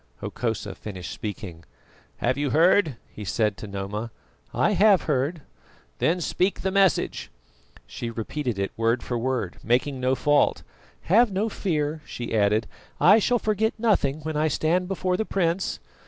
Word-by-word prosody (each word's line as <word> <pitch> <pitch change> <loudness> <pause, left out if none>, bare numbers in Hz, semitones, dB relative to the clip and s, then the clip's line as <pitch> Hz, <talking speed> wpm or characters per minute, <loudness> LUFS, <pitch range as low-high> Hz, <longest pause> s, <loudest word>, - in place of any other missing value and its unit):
Hokosa 110 -4 -3
finished 90 -3 -7
speaking. 95 -6 -6 0.5
"Have 125 +2 0
you 145 0 -1
heard?" 165 +1 +4 0.2
he 105 - -8
said 105 +1 0
to 105 - -8
Noma. 100 +3 -4 0.4
"I - - +2
have 205 -2 +5
heard." 150 +2 -1 0.6
"Then 170 +3 +2
speak 185 +3 0
the 190 - -1
message." 195 -4 +2 0.6
She 115 - -6
repeated 115 +1 -3
it 100 0 -2
word 115 +2 +1
for 125 - -3
word, 120 -7 -2
making 130 +4 +1
no 130 +1 +1
fault. 145 +2 +2 0.4
"Have 225 +5 +4
no 200 +4 0
fear," 155 -6 -2
she 120 -5 -5
added, 105 +1 +2 0.3
"I 205 +5 +7
shall 245 +3 +2
forget 215 0 0
nothing 185 -11 +1
when 155 +1 -4
I 155 +1 +2
stand 170 +4 +1
before 185 -1 -1
the 220 - 0
prince." 185 -3 -1
145 Hz, 155 wpm, -25 LUFS, 115-185 Hz, 0.6 s, I